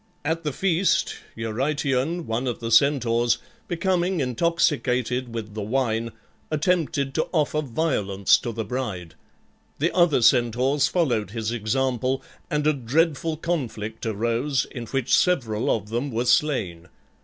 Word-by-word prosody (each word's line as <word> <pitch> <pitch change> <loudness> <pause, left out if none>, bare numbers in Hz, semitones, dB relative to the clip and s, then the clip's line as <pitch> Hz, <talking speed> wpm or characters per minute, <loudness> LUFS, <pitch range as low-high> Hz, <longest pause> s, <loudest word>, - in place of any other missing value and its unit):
At 165 +2 -1
the 150 - -1
feast 180 +5 +1 0.2
Eurytion, 135 +7 -1
one 115 +3 -2
of 120 - -2
the 115 0 -4
Centaurs, 120 -2 +3 0.3
becoming 180 0 0
intoxicated 125 -3 0
with 110 -2 -5
the 110 - -4
wine, 115 0 -1 0.4
attempted 155 -3 0
to 160 - 0
offer 155 -1 +1
violence 115 - +1
to 120 - -4
the 110 -1 -4
bride; 100 -8 -4 0.6
the 165 +5 0
other 170 -8 +4
Centaurs 125 +4 +3
followed 125 - 0
his 110 +1 -3
example, 130 +3 -1 0.3
and 150 0 0
a 155 - +4
dreadful 155 +4 0
conflict 115 -10 -3
arose 120 +5 0
in 120 -2 -6
which 135 +1 +1
several 120 -12 +1
of 105 -2 -1
them 120 +5 -2
were 120 0 -1
slain. 115 - +1
130 Hz, 130 wpm, -24 LUFS, 115-155 Hz, 0.6 s, other